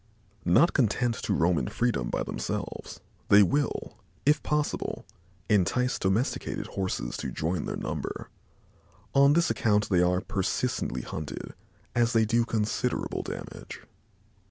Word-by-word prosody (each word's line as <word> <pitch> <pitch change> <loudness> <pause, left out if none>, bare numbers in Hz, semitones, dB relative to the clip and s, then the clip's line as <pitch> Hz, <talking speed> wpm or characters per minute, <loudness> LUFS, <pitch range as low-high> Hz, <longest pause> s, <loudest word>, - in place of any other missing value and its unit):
Not 110 - +5
content 120 -2 +2
to - - -1
roam 85 -1 +3
in 60 - -2
freedom 120 - 0
by - - -1
themselves, - - -5 0.3
they 100 +1 +8
will, 145 +9 -1 0.3
if 150 +2 +4
possible, 150 -1 -1 0.4
entice 115 +5 +2
domesticated 95 +7 -1
Horses 95 -11 -3
to - - -3
join 80 +1 -2
their - - -3
number. - - -5 0.8
On 140 +1 +6
this 170 +2 +3
account 105 -2 +2
they 90 -3 +4
are 90 0 +3
persistently 65 -7 -1
hunted, 75 -1 -6 0.4
as 120 0 +2
they 115 -1 +4
do 115 +2 +2
considerable 110 -2 -1
damage. - - -8
105 Hz, 130 wpm, -28 LUFS, 90-125 Hz, 0.8 s, they